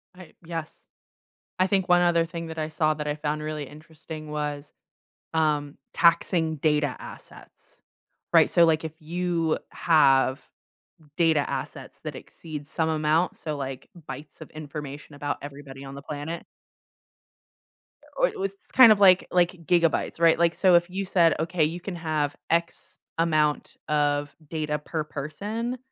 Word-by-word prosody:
I 185 -2 -13
yes, 165 -2 -6 0.8
I 185 - +4
think 190 -2 0
one 175 0 +6
other 170 -1 +3
thing 165 0 -6
that 160 0 -6
I 155 - -2
saw 155 0 +1
that 150 -1 -5
I 150 - -1
found 150 0 -3
really 155 -1 -4
interesting 155 0 -10
was, 150 -1 -4 0.6
um, 150 -2 0 0.2
taxing 165 -1 +3
data 150 -2 +1
assets. - - -12 0.8
Right, - - +6
so, 170 - +5
like, 160 0 +2
if 160 - -4
you 170 0 -1
have 135 -5 +3 0.8
data 160 -4 +2
assets - - -6
that - - -5
exceed 150 -3 -9
some 160 0 -1
amount, 155 +2 +1
so, 155 -2 -4
like, 135 -1 -6 0.2
bytes 140 +3 -9
of - - -9
information 150 -1 -8
about 145 0 -3
everybody 140 -1 -9
on 135 0 -8
the 140 - -8
planet. 150 +3 -6 1.7
Or - - +3
it 430 - -8
was 390 +1 -1 0.2
kind 255 -4 +9
of 210 - +4
like 185 -2 +6
like 175 -1 +3
gigabytes, 170 -2 +1
right? 165 -1 +5
Like, 170 0 +3
so 185 -2 +5
if 170 +1 +3
you 195 +2 -3
said, 170 -3 +3
okay, 165 0 0
you 165 +3 -1
can 185 -1 -5
have 155 -3 -1
X 170 0 -2 0.2
amount 155 -3 +1
of 145 -1 0
data 155 -2 -2
per 155 +1 -3
person, 210 - -4
155 Hz, 155 wpm, -26 LUFS, 150-170 Hz, 1.7 s, kind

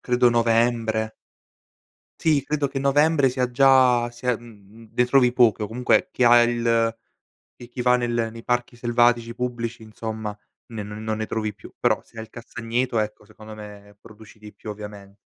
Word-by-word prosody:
credo 125 0 +3
novembre. 115 -1 +1 1.1
Sì, 150 -4 +2
credo 145 -1 -1
che 135 - -4
novembre, 140 +1 +3
sia 125 -1 -1
già 125 -2 +4
sia 120 0 -2
mhmm, 110 -1 -16
ne 125 - +3
trovi 125 -1 +4
poche, 115 -4 +3
o - - -1
comunque 125 - +1
chi - - -1
ha 120 0 +7
il 115 -1 +1 0.6
e 120 - -12
chi 125 - -8
va 125 0 +4
nel 120 -2 0
nei 115 0 -10
parchi 120 0 -1
selvatici 120 0 +1
pubblici, 120 -2 -4
insomma 110 -1 -6 0.4
ne 110 -2 -5
non 105 +1 -8
ne 110 - -3
trovi 110 -2 -3
più, 100 - -14
però - - +1
se - - -25
hai 110 - -5
il - - -20
castagneto, 120 0 -3
ecco 105 0 -3
secondo 110 +1 -13
me, 105 -1 -12
produci 110 -1 -16
di 105 -1 -12
più 110 - -9
ovviamente. 105 -1 -10
115 Hz, 175 wpm, -23 LUFS, 110-125 Hz, 1.1 s, ha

